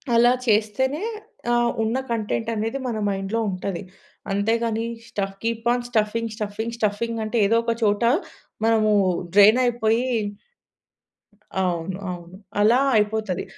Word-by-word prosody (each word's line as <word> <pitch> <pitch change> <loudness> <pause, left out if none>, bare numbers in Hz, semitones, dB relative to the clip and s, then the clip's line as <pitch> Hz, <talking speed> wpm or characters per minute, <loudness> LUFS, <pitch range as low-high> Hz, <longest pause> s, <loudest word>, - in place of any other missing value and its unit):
అలా 240 +1 +6 0.2
చేస్తేనే, 225 - +1 0.5
ఆహ్, 240 0 +3
ఉన్న 225 +3 0
కంటెంట్ 225 0 -1
అనేది 225 +5 -2
మన 230 -3 -2
మైండ్‌లో 195 +3 -2
ఉంటది. 185 0 -4 0.5
అంతేగాని 225 +2 0 0.2
stuff, 195 -1 -3
keep 230 0 -2
on 245 0 -2
stuffing, 225 0 0
stuffing, 220 +2 -4
stuffing 225 +2 -1
అంటే 215 +2 -2
ఏదో 230 +3 +3
ఒక 230 0 0
చోట 205 +2 +2 0.6
మనము 220 -1 +3 0.4
డ్రెయిన్ 210 +4 +7
అయిపోయి 235 0 +1 1.6
అవును. 180 0 -2
అవును. 175 +1 -9 0.2
అలా 225 +4 +5 0.2
అయిపోతది. 210 -3 0
220 Hz, 120 wpm, -23 LUFS, 205-230 Hz, 1.6 s, డ్రెయిన్